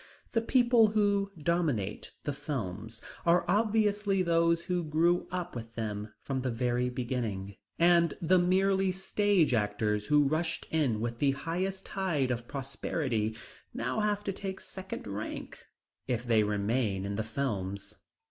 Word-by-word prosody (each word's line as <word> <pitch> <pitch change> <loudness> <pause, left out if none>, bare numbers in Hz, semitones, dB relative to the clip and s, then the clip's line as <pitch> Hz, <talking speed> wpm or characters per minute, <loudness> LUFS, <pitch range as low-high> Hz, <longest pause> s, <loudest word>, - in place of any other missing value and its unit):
The 230 - +2
people 235 -1 +5
who 205 -2 +1
dominate 150 - 0
the 145 - -2
films 115 - -5 0.2
are 170 +1 +4
obviously 210 -2 +2
those 170 0 +3
who 180 0 -1
grew 165 +3 +2
up 180 -3 -4
with 115 -1 -7
them 105 -1 -4
from 135 -2 -2
the 130 - -1
very 125 +1 0
beginning, 115 -6 -3 0.2
and 170 0 +4
the 180 +2 +4
merely 190 +1 +3
stage 190 -4 +2
actors 105 -1 0
who 150 -1 +4
rushed 160 +2 -1
in 135 -9 +1
with 120 0 -3
the 140 -2 +3
highest 185 +6 -3
tide 170 -10 0
of 120 -1 -3
prosperity 130 -5 -2 0.4
now - - -1
have 210 -1 0
to 195 - -2
take 190 0 -5
second 190 0 -6
rank 105 +1 -6 0.4
if 125 -2 -1
they 115 -3 +4
remain 105 -1 0
in 100 - -3
the 110 - -1
films. 105 -5 -3
150 Hz, 145 wpm, -30 LUFS, 115-185 Hz, 0.4 s, people